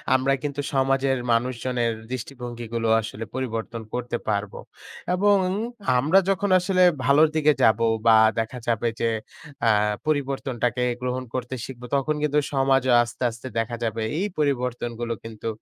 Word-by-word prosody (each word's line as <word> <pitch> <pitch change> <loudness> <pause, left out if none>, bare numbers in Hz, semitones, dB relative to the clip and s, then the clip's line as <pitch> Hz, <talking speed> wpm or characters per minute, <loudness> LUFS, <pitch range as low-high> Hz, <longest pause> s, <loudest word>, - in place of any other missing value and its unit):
আমরা 130 +1 +2
কিন্তু 145 -1 -2
সমাজের 135 0 +2
মানুষজনের 120 0 0 0.2
দৃষ্টিভঙ্গিগুলো 120 -2 -4
আসলে 110 0 -6
পরিবর্তন 115 -3 -4
করতে 120 -1 -2
পারবো। 100 -1 -2 0.6
এবং 205 +2 +4 0.6
আমরা 155 +9 +4
যখন 195 +1 +1
আসলে 185 0 +2 0.2
ভালোর 145 +3 +6
দিকে 150 -1 +4
যাবো 110 +1 +4 0.2
বা 110 -1 +8 0.2
দেখা 115 +3 -3
যাবে 115 0 +1
যে 115 - +1 0.6
আ - - +6 0.4
পরিবর্তনটাকে 135 -4 -1 0.2
গ্রহণ 125 0 -2
করতে 130 0 -3
শিখবো 125 -2 -9
তখন 140 +3 0
কিন্তু 150 0 +2
সমাজও 135 -2 +3
আস্তে, 120 +1 -7
আস্তে 120 +3 -9
দেখা 115 +1 -2
যাবে 115 0 -2 0.2
এই 200 - 0
পরিবর্তনগুলো 120 -4 -1
কিন্তু 115 0 -7
125 Hz, 135 wpm, -24 LUFS, 115-140 Hz, 0.6 s, বা